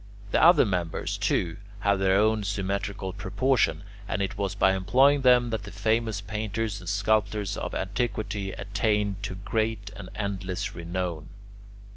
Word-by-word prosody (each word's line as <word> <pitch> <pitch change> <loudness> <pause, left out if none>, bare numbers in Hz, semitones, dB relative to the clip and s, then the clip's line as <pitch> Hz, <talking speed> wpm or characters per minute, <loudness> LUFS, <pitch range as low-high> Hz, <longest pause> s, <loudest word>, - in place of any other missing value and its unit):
The - - +3
other 165 -4 +7
members, 90 -5 -2
too, 85 -2 0 0.2
have 100 -1 +2
their 95 0 +3
own 110 +1 +3
symmetrical 100 -1 -2
proportions, 105 - +1 0.2
and 100 - -2
it 100 -1 -2
was 100 -1 -2
by 95 -1 +4
employing 130 +10 +4
them 125 -2 +5
that 110 -3 -1
the 100 -1 -9
famous 110 -2 0
painters 105 +1 -3
and 85 -1 -7
sculptors 100 0 +1
of - - -4
antiquity 105 -1 -2
attained 100 0 -1
to 100 -2 -4
great 110 0 -2
and 100 -2 -9
endless 95 -3 -3
renown. 85 -2 -4
100 Hz, 145 wpm, -27 LUFS, 95-110 Hz, 0.2 s, other